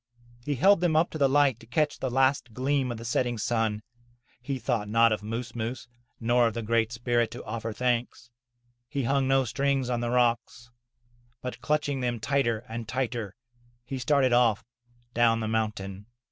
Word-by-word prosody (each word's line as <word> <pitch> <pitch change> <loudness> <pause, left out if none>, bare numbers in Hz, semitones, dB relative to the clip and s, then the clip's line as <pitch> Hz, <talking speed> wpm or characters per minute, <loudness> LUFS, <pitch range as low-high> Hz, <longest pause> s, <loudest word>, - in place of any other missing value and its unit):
He 145 +2 -1
held 190 +7 +5
them 170 -3 +2
up 160 +3 +3
to 155 - -6
the 140 -1 +4
light 135 -4 +3
to - - -16
catch 150 +5 0
the 130 - -2
last 130 -2 +1
gleam 130 0 0
of 120 - -5
the 115 - -8
setting 120 0 0
sun. 110 -1 -1 0.6
He 135 +2 -3
thought 115 -4 -2
not 115 +1 +4
of 110 - -1
Moos 115 +2 -5
Moos, 120 +2 -4 0.3
nor 120 +1 +3
of 115 - -4
the 115 - -3
Great 115 0 +1
Spirit, 120 0 0
to - - -8
offer 115 +1 -4
thanks. 120 +1 -2 0.6
He 140 -2 -2
hung 135 +2 +1
no 135 0 +3
strings 135 +1 0
on 120 - 0
the 120 0 -2
rocks, 120 0 0 0.7
but 125 - -6
clutching 145 -2 0
them 120 -2 -1
tighter 120 -2 0
and 115 0 -6
tighter, 120 -6 -3 0.5
he 135 +1 -5
started 130 0 +2
off 115 -3 +3 0.5
down 115 -1 +3
the 110 - -2
mountain. 105 -3 -3
120 Hz, 180 wpm, -27 LUFS, 115-135 Hz, 0.7 s, held